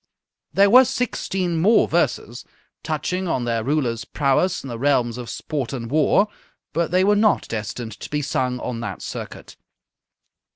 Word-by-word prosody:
"_ - - -24
There 200 0 +5
were 255 +3 +9
sixteen 195 -9 -2
more 215 +6 +5
verses, - - -1 0.4
touching 185 +1 -2
on 130 -7 -1
their 115 -2 -1
ruler's 125 -4 0
prowess 145 +7 0
in - - -7
the 120 -3 -6
realms 125 -3 +1
of 120 -2 -7
sport 140 -1 -4
and 120 -2 -5
war, 155 +7 +3 0.5
but 165 0 0
they 185 +2 +3
were 205 +2 +4
not 210 0 +2
destined 110 +1 -5
to - - -8
be 150 0 -2
sung 125 -2 -1
on 120 -2 -4
that 115 - -6
circuit. - - -8
145 Hz, 165 wpm, -22 LUFS, 120-185 Hz, 0.5 s, were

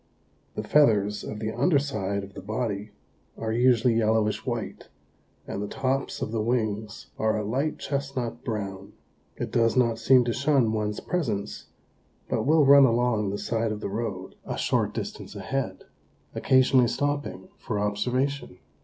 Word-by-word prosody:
The - - -3
feathers 105 -8 +3
of 105 - -6
the 110 0 -3
underside 120 - 0
of 100 0 -11
the - - -8
body 105 0 -3 0.5
are 110 -1 -2
usually 120 0 +4
yellowish 110 -1 +1
white 120 -4 -4 0.6
and 100 - -5
the 105 - -3
tops 135 +3 -2
of - - -4
the 110 -1 -1
wings 110 -2 -2
are 110 0 +1
a 105 - -2
light 135 +9 -1
chestnut 135 -4 -3
brown. 100 -4 -5 0.4
It - - -4
does 115 +1 +2
not 115 -3 +2
seem 125 +2 +5
to 120 - 0
shun 130 -3 +2
one's 105 -1 -2
presence, 115 - -3 0.6
but - - -1
will 155 -1 +5
run 140 0 +8
along 115 -4 +1
the 100 - -3
side 110 +2 -1
of 105 - -4
the 105 - -4
road, 100 -3 -4
a - - -5
short - - 0
distance - - -6
ahead, - - -3 0.5
occasionally 130 -1 +4
stopping 145 +7 -2
for 110 - -3
observation. 125 +3 -1
115 Hz, 155 wpm, -26 LUFS, 105-130 Hz, 0.6 s, run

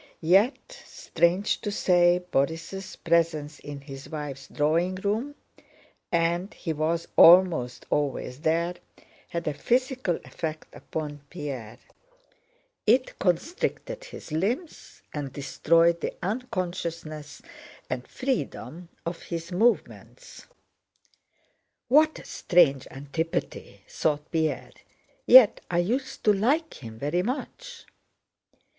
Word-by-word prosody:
Yet 195 - +2
strange 180 +4 0
to 210 - -3
say 180 -3 +3
Borís' 165 +7 -2
presence 160 -3 +1
in 145 -1 -8
his 135 -1 -10
wife's 145 -4 -6
drawing 165 +5 +1
room 215 +9 -2 0.8
(and 170 +3 +1
he 165 - -3
was 160 +2 -1
almost 165 -9 +6
always 140 -3 -1
there) 165 +2 +1 0.5
had 170 -1 -4
a 150 - 0
physical 250 - 0
effect 155 -1 -6
upon 150 -2 -6
Pierre; 130 -9 -6 1.1
it 250 +4 +2
constricted 350 - -1
his - - -11
limbs 225 - -3
and 145 -3 -4
destroyed 165 +4 +2
the - - -3
unconsciousness 175 - -4 0.4
and 125 0 -4
freedom 180 - -4 0.2
of 170 +1 -4
his 170 0 -6
movements. 235 - -1 1.4
"What 310 +4 +5
a - - -11
strange 155 -7 +3
antipathy," 145 +4 -4
thought 150 -1 -1
Pierre, 160 -2 -1 0.6
"yet 250 -4 +8
I 175 - 0
used 250 +10 -1
to 210 - +5
like 265 - 0
him 110 -1 -9
very 150 +8 0
much." 470 - -5
170 Hz, 105 wpm, -26 LUFS, 150-205 Hz, 1.4 s, yet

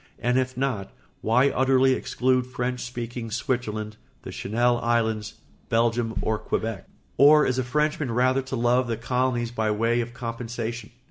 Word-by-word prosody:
And 125 +2 0
if 130 -1 -2
not, 125 -7 -2 0.3
why 125 +5 +3
utterly 130 0 +3
exclude 130 0 0
French 125 0 -3
speaking 120 -1 -5
Switzerland, 110 -2 -3 0.3
the - - -7
Channel 120 +3 +1
Islands, 110 -3 0 0.3
Belgium, 115 0 +1
or 110 -1 0
Quebec? 110 -3 -3 0.3
Or 150 +2 +7
is 130 0 0
a - - +1
Frenchman 150 +2 0
rather 130 +3 +2
to 130 0 -5
love 120 +1 +2
the 115 -1 -2
colonies 120 0 -1
by 110 -2 -1
way 115 +3 +1
of 120 +1 -7
compensation? 115 -1 -5
120 Hz, 150 wpm, -25 LUFS, 115-130 Hz, 0.3 s, Or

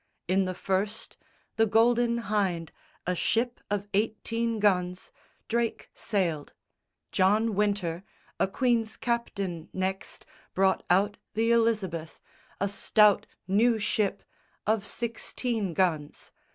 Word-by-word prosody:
In 190 +2 +2
the 185 0 -3
first, 195 +4 -2 0.4
The 225 0 +4
Golden 235 +2 +3
Hynde, 190 -6 -1 0.3
a 180 - +1
ship 235 +7 0
of 205 0 -2
eighteen 225 +2 0
guns, 180 -3 +1 0.4
Drake 235 0 -1
sailed: 170 -8 -1 0.6
John 210 +4 +3
Wynter, 200 -4 0 0.4
a - - +3
queen's 230 +1 0
captain, 200 -8 -2
next 190 +1 -3 0.3
Brought 190 0 +3
out 200 +3 +3 0.2
the 225 +1 +2
Elizabeth, 210 -9 +1 0.4
a 200 - +1
stout 210 +1 +4 0.2
new 225 +4 +3
ship 210 -1 0 0.4
Of 215 -1 +1
sixteen 230 -4 -2
guns. 160 -5 -1
205 Hz, 110 wpm, -28 LUFS, 185-225 Hz, 0.6 s, The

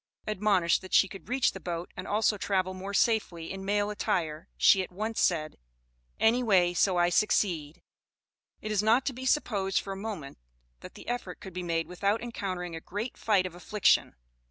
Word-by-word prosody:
Admonished 195 -5 +2
that 185 - -3
she 195 - +6
could 195 +3 -11
reach 255 +1 +2
the 190 - -8
boat 175 -1 -5
and - - -7
also 210 +1 +2
travel 190 -2 -1
more 190 +2 -6
safely 200 -6 0
in 195 0 -7
male 205 +1 0
attire 160 -6 -2
she 195 - +6
at 185 - -6
once 215 +4 -3
said, 155 -3 +1 0.6
"Any 225 +4 +4
way 185 -7 +3
so 180 +1 +2
I 175 0 +4
succeed." 175 -5 0 0.8
It 215 - -4
is 210 -2 +2
not 225 +5 +3
to 270 - -1
be 260 +1 -5
supposed 200 -10 +1
for 195 - -5
a - - -7
moment, 195 - -6 0.4
that - - -12
the - - -12
effort 240 -7 -4
could 190 - -10
be 180 - -4
made 165 -2 -1
without 200 +4 0
encountering 185 -7 -4
a 165 - -7
great 210 +9 -5
"fight 200 -4 +2
of 185 - -5
affliction." 190 +3 +2
195 Hz, 190 wpm, -29 LUFS, 175-215 Hz, 0.8 s, she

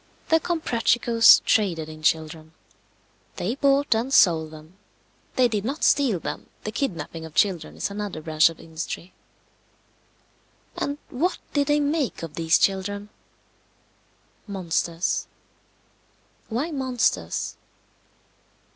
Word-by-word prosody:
The 325 - +5
Comprachicos 240 -8 +4
traded 175 -7 +1
in 155 0 -10
children. 160 0 -1 0.8
They 205 +7 -2
bought 280 0 +2
and 230 +4 -1
sold 165 -10 +4
them. 155 +4 -14 0.6
They 255 -1 +4
did 215 -4 -2
not 275 +7 -3
steal 250 -11 +3
them. - - -6 0.2
The 215 - -4
kidnapping 170 - -4
of 160 -1 -10
children 180 -6 +1
is - - -2
another 205 -4 -5
branch 155 0 +3
of 165 - -11
industry. 165 +2 -7 1.6
And 285 +1 -3
what 330 +9 0 0.2
did 285 -1 +1
they 295 0 +3
make 290 - -1
of 165 - -6
these 165 -1 +3
children? 200 +1 -1 1.4
Monsters. 175 -3 -1 1.2
Why 260 +9 -2
monsters? 260 -4 -1
205 Hz, 110 wpm, -24 LUFS, 165-265 Hz, 1.6 s, The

